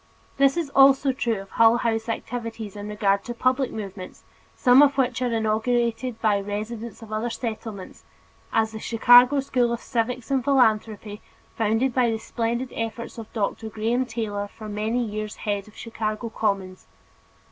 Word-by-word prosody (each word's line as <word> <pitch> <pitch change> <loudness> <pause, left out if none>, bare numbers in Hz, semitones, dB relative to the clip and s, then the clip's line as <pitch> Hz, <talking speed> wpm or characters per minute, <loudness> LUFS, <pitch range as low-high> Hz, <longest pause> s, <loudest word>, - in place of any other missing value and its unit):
This 275 +2 +4
is 320 -5 -2
also 270 0 +5
true 235 -4 -1
of 195 - -14
Hull 230 +1 +5
House 225 -1 -1
activities 225 -2 -5
in 205 0 -6
regard 200 -1 +1
to 240 - -5
public 255 +2 +1
movements, 195 -3 -8 0.3
some 250 +1 +6
of 280 -1 +4
which 250 -2 +1
are 250 -1 0
inaugurated 230 +2 0
by 210 -3 +2
the 200 - -11
residents 220 +2 -5
of 215 -1 -9
other 220 +3 -1
Settlements, 220 -5 -6 0.5
as 220 0 +1
the 220 - -7
Chicago 245 +5 +6
School 250 -3 +1
of 235 - -2
Civics 245 +1 -3
and 265 -2 +1
Philanthropy, 220 -5 +1 0.3
founded 225 +4 +1
by 245 -2 +3
the 225 - -1
splendid 235 +3 -3
efforts 230 +1 -5
of 220 - -9
Dr. 220 0 -2
Graham 230 +4 -1
Taylor 210 -3 -3
for 215 +1 -11
many 215 +4 -1
years 215 0 -5
head 205 -1 -3
of 215 - -17
Chicago 225 0 -4
Commons. 195 -4 -2
225 Hz, 165 wpm, -24 LUFS, 215-245 Hz, 0.5 s, some